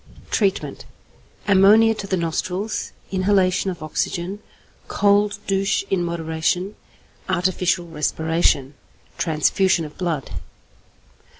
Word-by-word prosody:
Treatment. 195 -3 -1 0.6
Ammonia 210 +3 +6
to 210 -2 -7
the 190 - 0
nostrils, 180 +5 -2 0.2
inhalation 190 0 +2
of 175 -4 -6
oxygen, 175 +5 -3 0.5
cold 205 0 +2
douche 195 0 +1
in 185 -2 +1
moderation, 170 +3 -1 0.5
artificial 180 0 +1
respiration, 160 -3 0 0.5
transfusion 170 +2 +2
of 150 - -11
blood. 165 - -2
185 Hz, 90 wpm, -22 LUFS, 165-195 Hz, 0.6 s, Ammonia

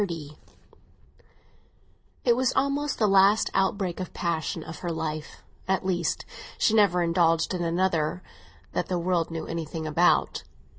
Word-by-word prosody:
XXX 165 -7 -4 1.9
IT 240 -2 +5
was 255 +1 +1
almost 280 +1 0
her 220 - +3
last 195 +2 +4
outbreak 190 -2 0
of 185 - -6
passive 165 -2 -2 0.2
grief; 160 -3 -4 0.2
at 190 0 0
least, 175 -3 -1 0.3
she 220 - +2
never 200 -5 +4
indulged 165 0 +2
in 175 -1 -2
another 170 0 0 0.5
that - - -2
the 180 - -1
world 175 -1 0
knew 165 -1 -5
anything 165 -1 -5
about. 160 +3 +2
175 Hz, 130 wpm, -26 LUFS, 165-195 Hz, 1.9 s, IT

